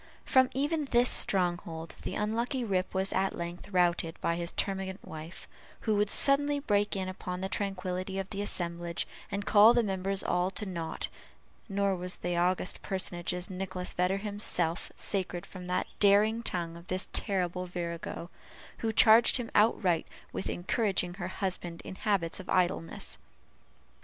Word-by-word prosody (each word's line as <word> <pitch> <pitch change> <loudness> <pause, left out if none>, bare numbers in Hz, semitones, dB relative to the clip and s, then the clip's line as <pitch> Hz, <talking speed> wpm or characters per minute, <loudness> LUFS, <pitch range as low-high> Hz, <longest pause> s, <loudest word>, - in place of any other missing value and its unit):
From 260 -1 +4
even 295 +3 0
this 245 -2 +4
stronghold 175 -3 +3
the - - -5
unlucky 235 +5 -1
Rip 185 -4 -1
was 190 +1 +1
at 190 0 0
length 170 +2 -6
routed 175 -3 +1
by 170 - 0
his 170 0 -2
termagant 190 -1 -3
wife, 160 +3 -9 0.3
who 215 -2 +1
would 205 0 +2
suddenly 285 +3 +6
break 205 -7 +1
in 190 -1 -2
upon 180 -1 -5
the 190 - -1
tranquillity 190 -1 -3
of 195 -1 -3
the 200 -1 -3
assemblage, 170 -3 -1 0.2
and 200 0 -3
call 215 +3 +7
the 240 - +4
members 195 -1 -1
all 180 +1 +1
to 200 +2 -5
nought; 170 -4 -4 0.6
nor 200 -1 +1
was 180 0 -3
that 175 0 -3
august 180 +1 0
personage, 180 -2 -1 0.2
Nicholas 185 -1 -4
Vedder 180 +2 +1
himself, 195 -5 -1
sacred 185 -3 -2
from 180 -2 -10
the 180 - 0
daring 210 +3 +4
tongue 170 -6 -3
of 170 +1 -13
this 185 +1 -1
terrible 180 -3 -1
virago, 170 0 -5 0.5
who 225 - -1
charged 225 +3 +6
him 240 -3 -5
outright 195 -6 +3 0.3
with - - -3
encouraging 190 -1 0
her 175 -1 -5
husband 180 -3 -3
in - - -6
habits 190 -4 -1
of 190 - -10
idleness. 175 -2 -1
190 Hz, 155 wpm, -30 LUFS, 175-205 Hz, 0.6 s, call